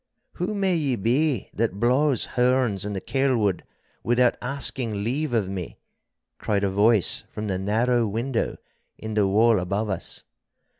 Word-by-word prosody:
'Who 190 Hz, +5 st, -3 dB
may 195 Hz, -3 st, +1 dB
ye 145 Hz, -6 st, 0 dB
be 125 Hz, +3 st, 0 dB
that 105 Hz, -3 st, -1 dB
blaws 130 Hz, +3 st, +2 dB
horns 125 Hz, -5 st, +1 dB
in 105 Hz, -, -3 dB
the 95 Hz, -, -3 dB
Kelwood 120 Hz, -7 st, 0 dB, 0.4 s
without 120 Hz, +1 st, +2 dB
asking 125 Hz, -5 st, -1 dB
leave 135 Hz, +6 st, -1 dB
of 110 Hz, -5 st, +1 dB
me?' 95 Hz, -3 st, -6 dB, 0.6 s
cried 100 Hz, -1 st, -1 dB
a 100 Hz, -, +1 dB
voice 105 Hz, 0 st, +3 dB
from 105 Hz, -, -6 dB
the 95 Hz, -3 st, -2 dB
narrow 115 Hz, +4 st, +1 dB
window 115 Hz, +4 st, -2 dB, 0.4 s
in 110 Hz, 0 st, -6 dB
the 105 Hz, -2 st, +2 dB
wall 110 Hz, +2 st, +4 dB
above 100 Hz, +4 st, -2 dB
us. 95 Hz, -, -5 dB
115 Hz, 150 wpm, -24 LUFS, 100-130 Hz, 0.6 s, wall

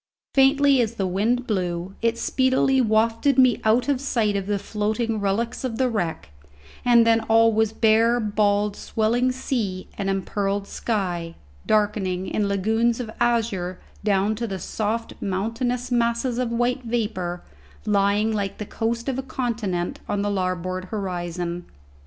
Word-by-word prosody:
Faintly 275 Hz, 0 st, +5 dB
as 230 Hz, 0 st, -1 dB
the 195 Hz, -, -1 dB
wind 220 Hz, +7 st, 0 dB
blew, 180 Hz, -3 st, -2 dB
it 230 Hz, 0 st, +1 dB
speedily 260 Hz, +1 st, +2 dB
wafted 230 Hz, +4 st, +2 dB
me 255 Hz, -3 st, +5 dB
out 225 Hz, +4 st, +3 dB
of 275 Hz, -3 st, +1 dB
sight 225 Hz, -7 st, 0 dB
of 195 Hz, -1 st, -2 dB
the 205 Hz, -1 st, +1 dB
floating 215 Hz, +2 st, -2 dB
relics 205 Hz, +6 st, -1 dB
of 240 Hz, -4 st, -3 dB
the 260 Hz, -, +2 dB
wreck, 170 Hz, -, -3 dB, 0.5 s
and 240 Hz, -2 st, +5 dB
then 230 Hz, 0 st, +4 dB
all 225 Hz, 0 st, +4 dB
was 220 Hz, 0 st, +2 dB
bare, 225 Hz, +2 st, +3 dB
bald, 210 Hz, -1 st, +1 dB
swelling 235 Hz, +3 st, 0 dB
sea 225 Hz, -8 st, -3 dB
and 195 Hz, -1 st, -1 dB
empearled 195 Hz, +1 st, -1 dB
sky, 180 Hz, -7 st, -3 dB, 0.3 s
darkening 205 Hz, -4 st, +1 dB
in 205 Hz, +2 st, -1 dB
lagoons 225 Hz, +4 st, +1 dB
of 230 Hz, -3 st, -5 dB
azure 210 Hz, -7 st, 0 dB, 0.2 s
down 200 Hz, 0 st, +2 dB
to 230 Hz, +2 st, -3 dB
the 195 Hz, -2 st, -4 dB
soft 220 Hz, +4 st, -3 dB
mountainous 230 Hz, +6 st, -2 dB
masses 235 Hz, +1 st, +1 dB
of 250 Hz, -2 st, 0 dB
white 245 Hz, +2 st, 0 dB
vapour 210 Hz, -7 st, -3 dB, 0.4 s
lying 205 Hz, +1 st, +2 dB
like 200 Hz, -2 st, -2 dB
the 210 Hz, -, -5 dB
coast 230 Hz, +3 st, -2 dB
of 265 Hz, -1 st, -1 dB
a -, -, 0 dB
continent 230 Hz, -9 st, -3 dB
on 200 Hz, -1 st, 0 dB
the 205 Hz, -, 0 dB
larboard 185 Hz, -1 st, -2 dB
horizon. 175 Hz, -3 st, -4 dB
220 Hz, 150 wpm, -24 LUFS, 195-235 Hz, 0.5 s, Faintly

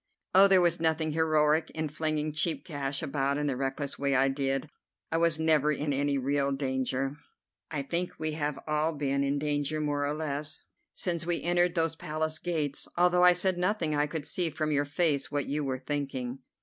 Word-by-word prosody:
"Oh, 195 Hz, +2 st, +8 dB
there 190 Hz, -2 st, +5 dB
was 170 Hz, -1 st, +2 dB
nothing 160 Hz, -1 st, +1 dB
heroic 155 Hz, 0 st, +2 dB
in 155 Hz, 0 st, -1 dB
flinging 155 Hz, 0 st, -1 dB
cheap 150 Hz, -2 st, -1 dB
cash 140 Hz, -4 st, -3 dB
about 140 Hz, 0 st, 0 dB
in 150 Hz, -, -1 dB
the 140 Hz, -3 st, 0 dB
reckless 135 Hz, +2 st, -3 dB
way 140 Hz, -1 st, +1 dB
I 135 Hz, +1 st, +4 dB
did. 135 Hz, +1 st, -1 dB, 0.4 s
I 165 Hz, -, +2 dB
was 165 Hz, -2 st, +3 dB
never 155 Hz, -2 st, +3 dB
in 145 Hz, 0 st, -1 dB
any 140 Hz, +1 st, +1 dB
real 140 Hz, +1 st, 0 dB
danger." 135 Hz, 0 st, -1 dB, 0.5 s
"I 145 Hz, -3 st, -3 dB
think 170 Hz, +5 st, -2 dB
we 155 Hz, 0 st, -2 dB
have 150 Hz, -2 st, -2 dB
all 155 Hz, +1 st, 0 dB
been 140 Hz, -1 st, 0 dB
in 140 Hz, +1 st, 0 dB
danger, 145 Hz, +1 st, -1 dB
more 145 Hz, -1 st, 0 dB
or 145 Hz, -, -1 dB
less, 150 Hz, -1 st, -1 dB, 0.3 s
since 170 Hz, -2 st, -2 dB
we 175 Hz, -1 st, 0 dB
entered 175 Hz, 0 st, +2 dB
those 165 Hz, -1 st, +1 dB
Palace 155 Hz, 0 st, -3 dB
gates. 150 Hz, -5 st, -1 dB
Although 180 Hz, 0 st, +4 dB
I 180 Hz, 0 st, +8 dB
said 180 Hz, 0 st, 0 dB
nothing 180 Hz, -4 st, 0 dB
I 145 Hz, 0 st, +1 dB
could 150 Hz, -1 st, -4 dB
see 175 Hz, 0 st, 0 dB
from 155 Hz, 0 st, -2 dB
your 145 Hz, 0 st, +2 dB
face 145 Hz, -1 st, 0 dB
what 145 Hz, -1 st, -1 dB
you 150 Hz, +2 st, -2 dB
were 130 Hz, -2 st, -2 dB
thinking." 135 Hz, -2 st, -4 dB
150 Hz, 195 wpm, -29 LUFS, 140-160 Hz, 0.5 s, Oh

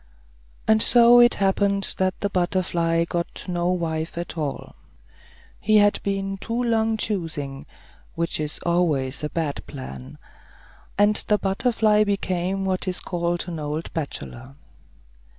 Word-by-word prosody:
And 220 Hz, 0 st, +4 dB
so 240 Hz, +1 st, +6 dB
it 240 Hz, 0 st, +6 dB
happened 200 Hz, 0 st, +1 dB
that 185 Hz, -1 st, 0 dB
the 200 Hz, -, 0 dB
butterfly 175 Hz, -2 st, +1 dB
got 170 Hz, 0 st, -4 dB
no 175 Hz, -1 st, 0 dB
wife 165 Hz, -2 st, -2 dB
at 170 Hz, -1 st, -5 dB
all. 150 Hz, -4 st, -4 dB, 0.9 s
He 215 Hz, +1 st, +3 dB
had 205 Hz, 0 st, +4 dB
been 195 Hz, 0 st, -2 dB
too 230 Hz, +4 st, -2 dB
long 225 Hz, -1 st, +1 dB
choosing, 155 Hz, -9 st, -3 dB, 0.5 s
which 170 Hz, -1 st, -1 dB
is 150 Hz, -1 st, -3 dB
always 155 Hz, -7 st, 0 dB
a 150 Hz, -, -1 dB
bad 155 Hz, -4 st, -3 dB
plan. 65 Hz, -, -9 dB, 0.8 s
And 205 Hz, +1 st, +4 dB
the 210 Hz, -, +4 dB
butterfly 210 Hz, +1 st, +2 dB
became 195 Hz, -1 st, -1 dB
what 190 Hz, 0 st, -1 dB
is 180 Hz, -1 st, -1 dB
called 175 Hz, 0 st, -2 dB
an 170 Hz, -2 st, -5 dB
old 150 Hz, +2 st, -4 dB
bachelor. 135 Hz, -4 st, -6 dB
180 Hz, 135 wpm, -23 LUFS, 160-205 Hz, 0.9 s, so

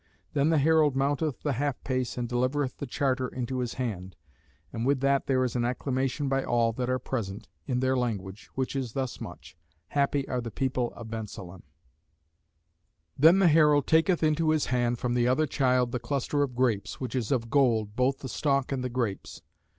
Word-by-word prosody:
Then 145 Hz, +1 st, +2 dB
the 165 Hz, -, +3 dB
herald 150 Hz, -1 st, +4 dB
mounteth 140 Hz, +1 st, 0 dB
the 145 Hz, -, 0 dB
half 140 Hz, +2 st, -1 dB
pace 130 Hz, -2 st, -2 dB
and 120 Hz, -1 st, -2 dB
delivereth 130 Hz, +2 st, -1 dB
the 145 Hz, -, -4 dB
charter 130 Hz, -1 st, 0 dB
into 125 Hz, +1 st, -4 dB
his 125 Hz, -2 st, -3 dB
hand: 95 Hz, -7 st, -4 dB, 0.6 s
and 115 Hz, -, -3 dB
with 135 Hz, +2 st, +2 dB
that 140 Hz, 0 st, +2 dB
there 130 Hz, -1 st, +2 dB
is 125 Hz, -1 st, -2 dB
an 120 Hz, -, +1 dB
acclamation 130 Hz, +3 st, -1 dB
by 135 Hz, 0 st, +1 dB
all 115 Hz, -1 st, +1 dB
that 125 Hz, +2 st, -3 dB
are 130 Hz, -, +2 dB
present 110 Hz, -5 st, -4 dB, 0.2 s
in 125 Hz, -2 st, 0 dB
their 130 Hz, 0 st, +2 dB
language, 105 Hz, -5 st, -3 dB
which 130 Hz, +1 st, -2 dB
is 130 Hz, -4 st, -3 dB
thus 130 Hz, -2 st, -3 dB
much: 85 Hz, 0 st, -9 dB, 0.3 s
Happy 140 Hz, -1 st, 0 dB
are 125 Hz, -1 st, -2 dB
the 115 Hz, -, -5 dB
people 125 Hz, +1 st, -1 dB
of 115 Hz, -2 st, -9 dB
Bensalem. 95 Hz, -5 st, -7 dB, 1.5 s
Then 165 Hz, +6 st, +6 dB
the 195 Hz, -2 st, +5 dB
herald 150 Hz, -3 st, +5 dB
taketh 165 Hz, +2 st, +3 dB
into 155 Hz, +1 st, +2 dB
his 155 Hz, -1 st, +2 dB
hand 120 Hz, -1 st, +1 dB
from 120 Hz, 0 st, -1 dB
the 120 Hz, 0 st, +2 dB
other 130 Hz, +5 st, +3 dB
child 125 Hz, -3 st, +1 dB
the 125 Hz, -, -2 dB
cluster 140 Hz, +3 st, -1 dB
of 135 Hz, -4 st, -1 dB
grapes, 120 Hz, -5 st, 0 dB
which 130 Hz, -3 st, -4 dB
is 125 Hz, -3 st, -2 dB
of 115 Hz, -4 st, -1 dB
gold, 115 Hz, -7 st, +2 dB
both 130 Hz, +2 st, +1 dB
the 130 Hz, -, -5 dB
stalk 140 Hz, +1 st, 0 dB
and 130 Hz, -2 st, -2 dB
the 125 Hz, -, -2 dB
grapes. 120 Hz, -5 st, -3 dB
130 Hz, 195 wpm, -28 LUFS, 120-140 Hz, 1.5 s, Then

